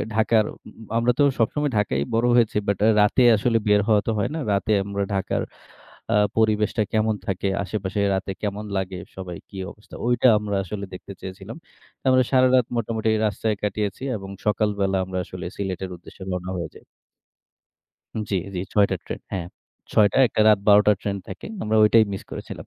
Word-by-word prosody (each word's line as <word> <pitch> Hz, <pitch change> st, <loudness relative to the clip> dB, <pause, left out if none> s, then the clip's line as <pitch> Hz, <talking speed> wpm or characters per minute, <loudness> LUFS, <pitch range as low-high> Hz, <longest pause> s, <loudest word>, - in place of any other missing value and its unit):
ঢাকার, 110 Hz, -1 st, +3 dB
ম -, -, -15 dB, 0.3 s
আমরা 120 Hz, +1 st, +3 dB
তো -, -, +6 dB, 0.2 s
সবসময় 145 Hz, +5 st, +1 dB
ঢাকায়ই 70 Hz, -9 st, 0 dB
বড় 115 Hz, +1 st, +2 dB
হয়েছি। 115 Hz, -3 st, +3 dB
বাট 100 Hz, -2 st, 0 dB, 0.2 s
রাতে 105 Hz, +5 st, +4 dB
আসলে 115 Hz, +2 st, +1 dB
বের 105 Hz, 0 st, +5 dB
হওয়া 105 Hz, -2 st, +4 dB
তো -, -, +2 dB
হয় 100 Hz, -, 0 dB
না। -, -, -2 dB
রাতে 100 Hz, +2 st, 0 dB
আমরা 100 Hz, 0 st, -2 dB
ঢাকার 95 Hz, -, -1 dB, 0.7 s
আ -, -, +4 dB, 0.2 s
পরিবেশটা 110 Hz, 0 st, +2 dB
কেমন 110 Hz, 0 st, +2 dB
থাকে, 95 Hz, +1 st, -1 dB, 0.2 s
আশেপাশে 100 Hz, +1 st, -3 dB
রাতে 95 Hz, 0 st, -3 dB
কেমন 105 Hz, +1 st, -3 dB
লাগে 95 Hz, -1 st, -3 dB, 0.2 s
সবাই 90 Hz, -2 st, -6 dB
কি 100 Hz, -, -11 dB, 0.2 s
অবস্থা। 105 Hz, -, -17 dB
ঐটা 120 Hz, +1 st, +3 dB
আমরা 100 Hz, -1 st, -2 dB
আসলে 100 Hz, +2 st, -5 dB
দেখতে 100 Hz, -, -9 dB
চেয়েছিলাম। 95 Hz, +5 st, -8 dB, 0.5 s
আমরা 130 Hz, 0 st, +5 dB
সারারাত 130 Hz, -1 st, +4 dB
মোটামুটি 110 Hz, -1 st, -1 dB, 0.2 s
রাস্তায় 105 Hz, +1 st, -1 dB
কাটিয়েছি 105 Hz, +2 st, -2 dB
এবং 95 Hz, -1 st, -8 dB, 0.2 s
সকালবেলা 100 Hz, -2 st, +1 dB
আমরা 95 Hz, 0 st, -4 dB
আসলে 90 Hz, -1 st, -7 dB
সিলেটের 95 Hz, -1 st, -4 dB
উদ্দেশ্যে 90 Hz, -, -14 dB
রওনা 90 Hz, 0 st, -4 dB
হয়ে 85 Hz, -3 st, -4 dB
যাই। -, -, -15 dB, 1.5 s
জ্বি, 100 Hz, -, +1 dB, 0.2 s
জ্বি 90 Hz, -, -2 dB
৬ঃ০০ 100 Hz, -2 st, +3 dB
র -, -, -43 dB
ট্রেন। -, -, -5 dB
হ্যাঁ। 90 Hz, -3 st, -3 dB, 0.5 s
৬ঃ০০, 105 Hz, +4 st, +4 dB
একটা 110 Hz, -, -2 dB
রাত 105 Hz, -2 st, +6 dB
১২ঃ০০ 105 Hz, +1 st, +6 dB
র -, -, -2 dB
ট্রেন 100 Hz, -1 st, -2 dB
থাকে। -, -, -8 dB, 0.2 s
আমরা 110 Hz, +1 st, 0 dB
ঐটাই 110 Hz, +1 st, +6 dB
মিস 95 Hz, -, -5 dB
করেছিলাম। -, -, -8 dB
105 Hz, 175 wpm, -23 LUFS, 95-110 Hz, 1.5 s, তো